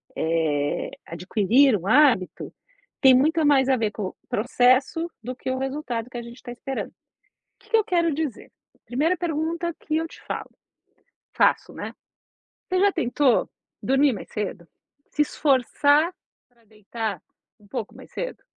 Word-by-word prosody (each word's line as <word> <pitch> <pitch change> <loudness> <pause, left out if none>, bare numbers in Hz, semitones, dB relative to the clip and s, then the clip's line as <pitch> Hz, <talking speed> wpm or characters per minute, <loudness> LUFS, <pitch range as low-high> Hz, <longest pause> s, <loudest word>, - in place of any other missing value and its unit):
eh, 155 -3 0
adquirir 210 +9 +3
um 185 +2 -8
hábito, 255 -8 +3 0.5
tem 265 -2 +8
muito 315 +5 +3
mais 270 -2 +4
a 260 - +5
ver 220 -2 0
com 210 - -5
o - - -18
processo 255 +9 +2
do 255 +2 -5
que 260 - -5
o 260 - -1
resultado 260 -3 -3
que 240 - -6
a - - -4
gente 235 +1 -12
tá 245 - -7
esperando. 265 +2 -5 0.7
Que - - -23
que 450 - +5
eu 435 - +3
quero 335 -3 +1
dizer? 295 -6 -4 0.2
A - - -31
primeira 310 +9 +1
pergunta 335 +1 -2
que 310 -1 -2
eu 325 +1 -1
te - - -14
falo - - -5 0.8
faço, - - +2
né: - - -6 0.8
você 370 0 +1
já 405 0 +5
tentou 255 -1 +2 0.3
dormir 270 +1 +3
mais 195 - -8
cedo? 195 -5 -4 0.4
Se 300 - 0
esforçar 290 +4 +2 0.4
pra 235 -2 -31
deitar 215 -2 -5 0.4
um 205 - -21
pouco 225 -1 -5
mais - - -14
cedo? - - -5
260 Hz, 160 wpm, -24 LUFS, 220-305 Hz, 0.8 s, tem